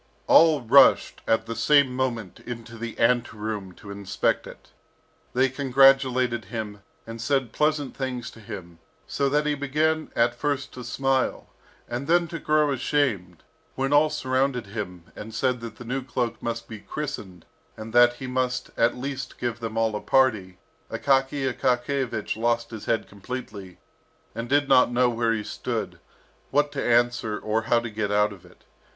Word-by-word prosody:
All 160 -3 +6
rushed 130 +3 +5
at 110 0 +2
the 115 0 -5
same 130 +2 +4
moment 120 -7 -3
into 115 -1 -8
the 115 0 -6
ante 120 -1 +2
room 105 -3 -4
to 100 +3 -11
inspect 100 -1 -1
it. - - -13 0.6
They 130 +2 +3
congratulated 130 -3 +3
him, 105 0 -6 0.2
and 115 0 -8
said 130 -2 0
pleasant 150 -1 0
things 130 -3 -4
to - - -15
him, 85 -5 -9 0.3
so 140 -1 0
that 150 +2 +1
he 150 - +1
began 155 +3 0
at 120 +1 +3
first 140 +2 -2
to 125 - -8
smile, 135 0 -1 0.4
and 120 +3 -4
then 170 +1 +3
to 165 - -5
grow 150 -1 +2
ashamed. 120 - -1 0.3
When 135 +2 0
all 150 +1 +5
surrounded 130 -4 0
him, 100 -4 -6
and 110 +1 -8
said 125 0 0
that 115 -2 -7
the 120 - -11
new 130 +3 -2
cloak 120 -2 -3
must 115 0 -4
be 110 -2 -8
"christened," 100 - -6 0.3
and 110 +1 -8
that 120 0 +6
he 130 - -7
must 130 0 -2
at 115 +1 +2
least 135 +1 -5
give 120 -2 -3
them 115 -1 -5
all 110 -1 +1
a 105 - -3
party, 110 -9 +2 0.3
Akaky 135 +3 +1
Akakiyevich 125 -2 -1
lost 115 +1 0
his 110 -2 -8
head 115 - 0
completely, 100 -3 -8 0.6
and 115 +1 -5
did 145 0 +3
not 130 -2 +5
know 125 0 +3
where 115 -1 0
he 110 -2 -1
stood, - - -4 0.5
what 145 +1 +2
to - - -3
answer, 120 -2 +2
or 110 +1 -1
how 120 - +5
to 120 -1 -6
get 105 -1 -2
out 105 0 +2
of 95 - -15
it. - - -22
120 Hz, 170 wpm, -25 LUFS, 110-135 Hz, 0.6 s, All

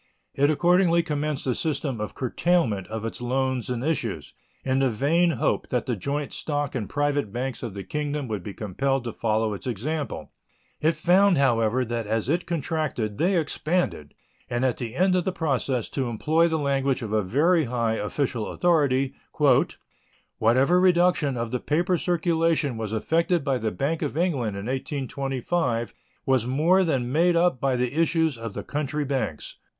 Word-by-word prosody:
It 140 +1 +2
accordingly 170 +2 +3
commenced 150 -2 -2
a 130 - +1
system 140 -5 -2
of 105 - -5
curtailment 130 - 0
of 110 0 -5
its 115 - -5
loans 130 0 -1
and 125 -1 -2
issues, 115 - -2 0.3
in 130 0 +1
the 135 -1 +3
vain 155 +10 +2
hope - - 0
that 125 -2 -1
the 125 - -1
joint 140 +7 -3
stock 145 -2 -2
and 115 -6 -3
private 145 -6 0
banks 125 +1 -4
of 115 -5 -6
the 100 - -5
Kingdom 150 0 -3
would 105 -4 -3
be 100 +2 -8
compelled 135 +6 -1
to 115 - -5
follow 110 -1 0
its 100 - -7
example. 140 +6 -3 0.5
It 160 +2 +2
found, 180 +4 +4
however, 120 -2 +2
that 115 -2 -3
as 110 +3 -1
it 170 +4 0
contracted 150 -10 -2
they 180 +2 +2
expanded, 155 - -1 0.3
and 120 +2 0
at 125 - +1
the 120 -1 -5
end 185 +3 +3
of 180 - +2
the 190 - -1
process, 135 - -1
to 130 -3 -2
employ 155 +9 +2
the 160 -1 0
language 135 -3 0
of 110 -1 -4
a 110 - +3
very 150 - +2
high 115 -2 0
official 115 +1 -2
authority, 140 -6 +2 1.3
"whatever 130 +11 +4
reduction 175 -6 +3
of 115 -1 -3
the 125 - -1
paper 175 +7 +1
circulation 165 -5 +1
was 110 -2 -4
effected 165 +9 +1
by 135 -3 0
the 110 -1 -1
Bank 140 - -2
of 150 -1 -3
England 135 - 0
(in 100 - -6
1825) 135 0 -2 0.3
was 130 -3 +2
more 165 +9 +3
than 130 -8 0
made 170 +4 +3
up 170 -7 +2
by 135 -2 +1
the 125 0 -1
issues 160 -2 +2
of 115 -3 -7
the - - -4
country 150 0 -2
banks." 130 - -3
135 Hz, 175 wpm, -25 LUFS, 120-160 Hz, 1.3 s, found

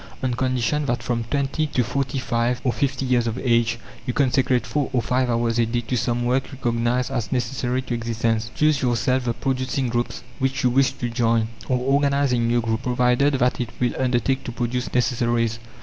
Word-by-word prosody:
on 130 -1 +1
condition 130 +3 0
that, 120 -1 -1
from 120 -1 -1
twenty 140 +4 -1
to 130 -4 0
forty 135 +3 -2
five 120 0 0
or 125 -3 +1
fifty 140 -1 -1
years 125 -2 +2
of 115 +1 -2
age, 115 -2 +2 0.3
you 125 - 0
consecrate 130 -2 +2
four 145 -2 -1
or 125 - +3
five 125 +1 0
hours 115 0 +1
a 115 - +4
day 120 +1 -1
to 120 +2 -3
some 120 0 0
work 130 +3 0
recognized 120 -1 0
as 115 - -2
necessary 125 0 -1
to 125 - -4
existence. 115 -1 -1
Choose 150 -2 +2
yourself 125 +1 +1
the 120 -1 -1
producing 130 0 -1
groups 120 -1 -2 0.2
which 135 +1 0
you 125 - +3
wish 135 +1 +3
to 120 - -3
join, 115 -1 +1 0.2
or 130 - +3
organize 140 +1 +2
a 120 - +2
new 120 +1 +2
group, 110 0 -1
provided 125 +2 +2
that 125 -1 +1
it 120 - -3
will 125 -1 +1
undertake 130 +1 +1
to - - -4
produce 125 +1 -2
necessaries. 120 -2 +1
125 Hz, 195 wpm, -23 LUFS, 120-130 Hz, 0.3 s, a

